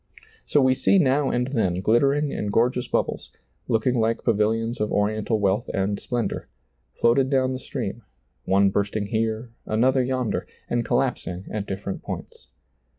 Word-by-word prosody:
So 145 Hz, -, +3 dB
we 130 Hz, 0 st, +5 dB
see 135 Hz, +9 st, +3 dB
now 140 Hz, -4 st, +3 dB
and 125 Hz, +1 st, 0 dB
then 110 Hz, -10 st, +1 dB
glittering 135 Hz, +9 st, +2 dB
and 105 Hz, -, -2 dB
gor 120 Hz, +4 st, +3 dB
geous 125 Hz, -1 st, -5 dB
bubbles, -, -, -1 dB, 0.4 s
looking 120 Hz, +2 st, +1 dB
like 115 Hz, +1 st, 0 dB
pavilions 115 Hz, +1 st, +1 dB
of 105 Hz, -, 0 dB
oriental 110 Hz, +2 st, 0 dB
wealth 100 Hz, +2 st, +1 dB
and 100 Hz, +1 st, 0 dB
splendor, 120 Hz, -2 st, -3 dB, 0.5 s
floated 130 Hz, +3 st, +3 dB
down 130 Hz, -1 st, +2 dB
the 130 Hz, -, -4 dB
stream, -, -, -5 dB, 0.4 s
one 100 Hz, +1 st, +4 dB
bursting 100 Hz, +1 st, -1 dB
here, 110 Hz, +2 st, -2 dB, 0.2 s
another 130 Hz, +5 st, +3 dB
yonder, 130 Hz, -2 st, -1 dB, 0.2 s
and 120 Hz, 0 st, 0 dB
collaps 125 Hz, +2 st, 0 dB
ing 90 Hz, +1 st, -5 dB
at 105 Hz, -1 st, -3 dB
different 95 Hz, 0 st, -4 dB
points. -, -, -8 dB
115 Hz, 155 wpm, -24 LUFS, 105-130 Hz, 0.5 s, we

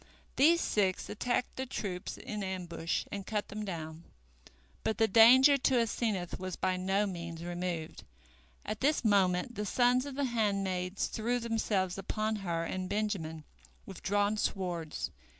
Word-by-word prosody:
These 330 Hz, +5 st, +5 dB
six 190 Hz, -3 st, 0 dB
attacked 245 Hz, +3 st, -1 dB
the 260 Hz, 0 st, -3 dB
troops 185 Hz, -7 st, -4 dB
in 210 Hz, -1 st, -5 dB
ambush 180 Hz, -3 st, -3 dB
and 200 Hz, -1 st, -4 dB
cut 210 Hz, +1 st, -3 dB
them 215 Hz, +1 st, -5 dB
down. 165 Hz, -4 st, -6 dB, 0.8 s
But 220 Hz, -, 0 dB
the 225 Hz, -, +4 dB
danger 255 Hz, +7 st, +8 dB
to 260 Hz, +1 st, +2 dB
Asenath 215 Hz, -5 st, -1 dB
was 185 Hz, -1 st, -4 dB
by 185 Hz, 0 st, 0 dB
no 190 Hz, +3 st, +1 dB
means 170 Hz, -3 st, -6 dB
removed. 175 Hz, -2 st, -4 dB, 0.6 s
At 215 Hz, 0 st, -4 dB
this 285 Hz, -2 st, +2 dB
moment 195 Hz, +2 st, +3 dB
the 210 Hz, -, -3 dB
sons 250 Hz, +4 st, +3 dB
of 280 Hz, -, -6 dB
the 285 Hz, 0 st, 0 dB
handmaids 195 Hz, -5 st, 0 dB
threw 235 Hz, +3 st, -1 dB
themselves 215 Hz, -5 st, -1 dB
upon 215 Hz, +2 st, -1 dB
her 170 Hz, -4 st, -2 dB
and 185 Hz, +2 st, -3 dB
Benjamin 190 Hz, -8 st, -2 dB, 0.4 s
with 195 Hz, -, -10 dB
drawn 205 Hz, +2 st, +1 dB
swords. 175 Hz, -6 st, -2 dB
200 Hz, 150 wpm, -31 LUFS, 180-225 Hz, 0.8 s, danger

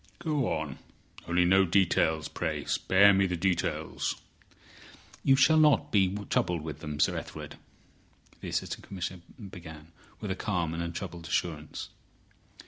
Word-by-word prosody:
Go 150 Hz, -2 st, -1 dB
on. 75 Hz, -4 st, -3 dB, 0.5 s
Only 90 Hz, +1 st, +3 dB
no 95 Hz, +2 st, +5 dB
details, 85 Hz, -4 st, +2 dB
pray. -, -, -3 dB
Spare 100 Hz, +2 st, +5 dB
me 95 Hz, 0 st, +3 dB
the 90 Hz, -, -2 dB
details." 90 Hz, 0 st, -1 dB, 1.1 s
"You 135 Hz, -, +5 dB
shall 155 Hz, +4 st, +5 dB
not 150 Hz, -2 st, +4 dB
be 95 Hz, -3 st, +4 dB, 0.2 s
troubled 85 Hz, -3 st, 0 dB
with 75 Hz, -2 st, -6 dB
them, 75 Hz, -1 st, -6 dB
Sir -, -, +3 dB
Ethelred," -, -, -7 dB, 0.8 s
the -, -, -6 dB
Assistant -, -, -3 dB
Commissioner 90 Hz, -2 st, -5 dB, 0.3 s
began, 80 Hz, -2 st, -11 dB, 0.3 s
with 105 Hz, -, -4 dB
a -, -, -1 dB
calm 90 Hz, -6 st, -1 dB
and 85 Hz, -, -3 dB
untroubled 85 Hz, 0 st, -5 dB
assurance. 80 Hz, -2 st, -3 dB
90 Hz, 135 wpm, -29 LUFS, 80-95 Hz, 1.1 s, no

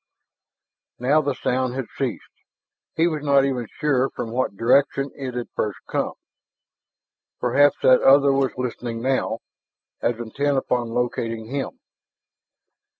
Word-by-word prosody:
Now 140 Hz, +5 st, +3 dB
the 140 Hz, -2 st, -1 dB
sound 125 Hz, 0 st, -1 dB
had 135 Hz, -2 st, -3 dB
ceased. -, -, -2 dB, 0.7 s
He 165 Hz, -, +3 dB
was 155 Hz, -3 st, -1 dB
not 140 Hz, -2 st, +4 dB
even 125 Hz, -4 st, -2 dB
sure 135 Hz, -3 st, +1 dB
from 115 Hz, -, -6 dB
what 125 Hz, -4 st, -1 dB
direction 135 Hz, +4 st, +2 dB
it 130 Hz, -3 st, -6 dB
had 120 Hz, -1 st, -4 dB
first 105 Hz, -3 st, -1 dB
come. -, -, -1 dB, 1.3 s
Perhaps 140 Hz, +4 st, +4 dB
that 130 Hz, -1 st, +6 dB
other 140 Hz, +1 st, +6 dB
was 135 Hz, -2 st, 0 dB
listening 120 Hz, -2 st, -4 dB
now, 135 Hz, 0 st, 0 dB, 0.6 s
as 120 Hz, -, 0 dB
intent 135 Hz, +5 st, -1 dB
upon 125 Hz, -2 st, 0 dB
locating 115 Hz, -1 st, -2 dB
him. 140 Hz, -1 st, -4 dB
130 Hz, 130 wpm, -23 LUFS, 120-140 Hz, 1.3 s, that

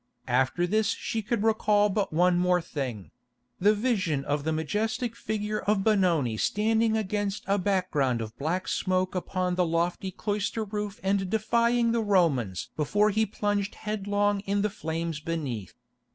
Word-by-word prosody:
After 130 Hz, +7 st, +2 dB
this 215 Hz, +4 st, +1 dB
she 225 Hz, +1 st, -2 dB
could 220 Hz, 0 st, -1 dB
recall 210 Hz, -2 st, +3 dB
but 200 Hz, -1 st, -1 dB
one 175 Hz, +2 st, +3 dB
more 180 Hz, 0 st, +3 dB
thing—the 125 Hz, -, -3 dB
vision 195 Hz, -, 0 dB
of 145 Hz, 0 st, -1 dB
the 160 Hz, -, 0 dB
majestic 215 Hz, -, -1 dB
figure 210 Hz, -1 st, -2 dB
of 200 Hz, 0 st, +1 dB
Benoni 175 Hz, -, +2 dB
standing 220 Hz, -, +2 dB
against 205 Hz, -1 st, -2 dB
a 200 Hz, +1 st, +1 dB
background 180 Hz, -, +1 dB
of 110 Hz, 0 st, -6 dB
black 170 Hz, +6 st, -1 dB
smoke 185 Hz, 0 st, 0 dB
upon 180 Hz, 0 st, -1 dB
the 180 Hz, 0 st, +2 dB
lofty 170 Hz, +3 st, -1 dB
cloister 210 Hz, +3 st, -2 dB
roof 210 Hz, +1 st, -4 dB
and 195 Hz, -1 st, +1 dB
defying 235 Hz, +2 st, +2 dB
the 230 Hz, 0 st, +1 dB
Romans 160 Hz, -, +1 dB
before 205 Hz, +8 st, +2 dB
he 220 Hz, +2 st, +1 dB
plunged 205 Hz, -1 st, -1 dB
headlong 205 Hz, -1 st, 0 dB
in 200 Hz, +1 st, +1 dB
the 210 Hz, -, 0 dB
flames 165 Hz, -3 st, -3 dB
beneath. 145 Hz, -, -4 dB
195 Hz, 150 wpm, -27 LUFS, 160-210 Hz, -, recall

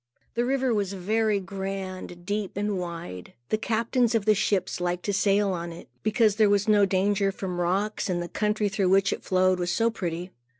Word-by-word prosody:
The 240 Hz, +1 st, 0 dB
river 260 Hz, -1 st, +1 dB
was 200 Hz, -2 st, -1 dB
very 210 Hz, +2 st, +1 dB
grand, 190 Hz, -2 st, -6 dB
deep, 205 Hz, 0 st, -3 dB
and 205 Hz, -2 st, -1 dB
wide. 170 Hz, -, -7 dB, 0.2 s
The 215 Hz, -, +2 dB
captains 230 Hz, +1 st, +1 dB
of 215 Hz, -3 st, +1 dB
the 215 Hz, -, +5 dB
ships 190 Hz, -3 st, 0 dB
liked 180 Hz, 0 st, -2 dB
to 205 Hz, -, 0 dB
sail 200 Hz, 0 st, +2 dB
on 170 Hz, -1 st, -4 dB
it, 165 Hz, -, -11 dB
because 215 Hz, -1 st, +2 dB
there 215 Hz, -2 st, +5 dB
was 205 Hz, 0 st, +2 dB
no 205 Hz, -2 st, +5 dB
danger 195 Hz, +1 st, +1 dB
from 185 Hz, -2 st, -4 dB
rocks, 195 Hz, +5 st, 0 dB
and 175 Hz, -1 st, 0 dB
the 175 Hz, -, -3 dB
country 210 Hz, +2 st, 0 dB
through 195 Hz, -1 st, 0 dB
which 195 Hz, +1 st, +4 dB
it -, -, -7 dB
flowed 185 Hz, 0 st, +2 dB
was 175 Hz, 0 st, -1 dB
so 230 Hz, +4 st, +2 dB
pretty. 175 Hz, -3 st, -4 dB
195 Hz, 200 wpm, -26 LUFS, 185-215 Hz, 0.2 s, the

